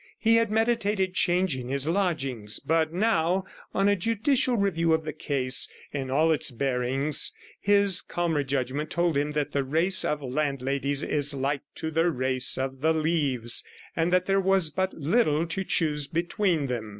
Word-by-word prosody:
He 225 0 +3
had 230 -2 +1
meditated 215 -4 0
changing 175 -8 0
his 140 +2 -2
lodgings; 140 - -1
but 160 0 0
now, 185 -2 +1 0.3
on 195 +1 +1
a 205 - +3
judicial 235 +6 +1
review 170 -5 +1
of 160 0 0
the 155 - -4
case 135 -4 +1 0.2
in 135 -2 -4
all 155 +5 +2
its 150 -5 +1
bearings, 135 +3 +1 0.3
his 200 -2 +3
calmer 170 -4 -2
judgment 135 +2 -3
told 170 -2 0
him 145 +1 -1
that 150 -1 -2
the 140 - -1
race 165 +8 +2
of 150 -1 -2
landladies 140 0 -1
is 145 0 +1
like 140 +1 -2
to 160 - -4
the 165 +2 +2
race 130 -3 +2
of 135 0 -4
the 160 +2 +2
leaves, 145 -7 +1 0.3
and 165 +1 0
that 180 0 +2
there 195 0 +1
was 190 -4 +2
but 190 +5 -1
little 160 -1 +1
to 170 +3 -3
choose 150 -5 0
between 170 -1 -1
them. 120 -4 -4
160 Hz, 165 wpm, -26 LUFS, 140-185 Hz, 0.3 s, He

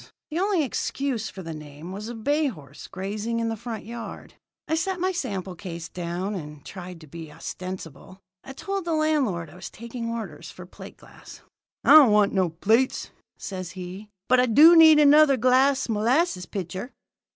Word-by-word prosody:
The 320 - -2
only 385 -4 +1
excuse 265 -3 -2
for 190 - -9
the 165 -1 -6
name 150 +2 -10
was 210 +4 -6
a 240 - -6
bay 290 +7 +1
horse 150 - -9
grazing 210 +5 -4
in 230 0 -1
the 225 - -2
front 225 -1 -7
yard. 230 0 -8 0.3
I - - -2
set 360 +3 -1
my 370 +2 +1
sample 195 - -4
case 170 -3 -7
down, 180 +3 -4
and 150 -6 -8
tried 180 -2 -9
to 155 - -13
be 160 +1 -9
ostensible. 185 +1 -8 0.2
I 270 - -9
told 390 +6 -4
the 335 -2 0
landlord 270 - 0
I - - -15
was 180 0 -8
taking 235 +1 -7
orders 230 -1 -6
for - - -11
plate - - -12
glass. - - -15 0.4
"'I - - +4
don't 295 -7 +9
want 210 -1 +3
no 185 -3 +2
plates,' 220 +10 +1 0.3
says 185 -3 -6
he, 185 +3 -8 0.2
'but 255 - +4
I 250 - +3
do 310 +9 +8
need 320 -2 +8
another 295 -1 +6
glass 260 +3 +3
molasses 230 - +1
pitcher.' 190 +6 -5
220 Hz, 180 wpm, -25 LUFS, 180-275 Hz, 0.4 s, don't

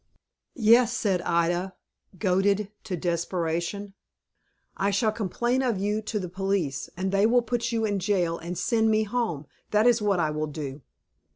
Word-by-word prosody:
"Yes," 235 0 +5
said 190 -5 +1
Ida, 175 +2 0 0.4
goaded 195 +2 +1
to 185 -4 -3
desperation; 170 +3 -2 0.8
"I 200 - 0
shall 210 +2 +2
complain 240 +5 -1
of 245 -6 0
you 205 +3 -1
to 220 0 -3
the 185 -3 -3
police, 180 -7 -2
and 190 +1 -1
they 200 +2 +4
will 245 +1 +3
put 240 +1 -1
you 225 -1 0
in 205 -2 0
jail, 180 -3 0
and 175 +1 -5
send 225 +3 +2
me 215 0 +3
home. 215 - -2 0.2
That 210 +1 +3
is 240 -2 +4
what 200 -3 +1
I 155 -2 +1
will 155 0 -2
do." 145 -2 -6
195 Hz, 165 wpm, -26 LUFS, 175-220 Hz, 0.8 s, Yes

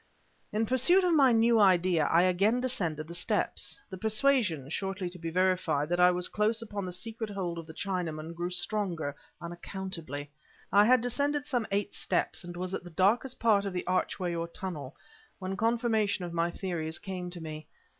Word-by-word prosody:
In 215 +2 +1
pursuit 260 - +4
of 355 -2 +3
my 275 -5 +6
new 230 0 +4
idea, 180 -5 +4
I 170 +2 +4
again 195 +6 +3
descended 175 - -1
the 170 - -8
steps. 175 - -1
The 190 - -7
persuasion 220 - +2
(shortly 195 0 -3
to 180 - -11
be 165 0 -4
verified) 180 -4 +1
that 175 0 0
I 180 0 +7
was 180 0 +1
close 215 +2 +1
upon 205 -4 -5
the - - -4
secret 220 +4 -4
hold 180 -4 -3
of 165 - -9
the 160 - -9
Chinaman, 170 -5 -3
grew 175 +1 -3
stronger, 175 -5 -2 0.2
unaccountably. 170 -4 -6 0.4
I 205 +1 +7
had 250 +1 +5
descended 285 +4 0
some 245 -6 -1
eight 205 +1 -1
steps, - - -1
and 175 0 -8
was 185 +1 -4
at 190 - -3
the 175 - -9
darkest 215 +9 +1
part 215 -3 +4
of 200 -2 -4
the 180 - -3
archway 180 -1 -1
or 170 0 -2
tunnel, 165 -6 -6 0.4
when 190 0 -4
confirmation 220 -3 +1
of 170 - -7
my 170 0 +1
theories 170 -3 -3
came 180 -2 -5
to 175 0 -7
me. 155 -1 -7
185 Hz, 185 wpm, -30 LUFS, 170-220 Hz, 0.4 s, I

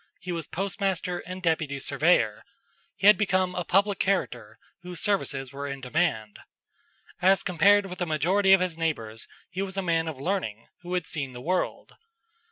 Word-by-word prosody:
He 180 - -6
was 165 -2 -4
postmaster 190 -2 -2
and 185 +1 -8
deputy 160 -4 0
surveyor. 145 +6 +2 0.5
He - - -4
had 210 +1 +8
become 185 -3 +1
a 180 - -2
public 200 +3 +2
character 195 -1 -1 0.2
whose 180 -1 -7
services 140 -11 -1
were 140 +1 -5
in 140 -1 -5
demand. 125 -6 -1 0.8
As 190 +2 +4
compared 200 +3 +4
with 180 -1 -8
the 175 - -1
majority 180 +6 +2
of 195 - +6
his 175 -3 -2
neighbors, 115 -9 -3 0.2
he 185 +2 -3
was 195 0 -4
a 195 - 0
man 165 -2 +1
of 155 -5 -5
learning 135 - -2 0.2
who 180 +1 -4
had 180 -2 -1
seen 135 -4 -4
the 125 - -8
world. 180 +6 -2
180 Hz, 175 wpm, -27 LUFS, 150-190 Hz, 0.8 s, had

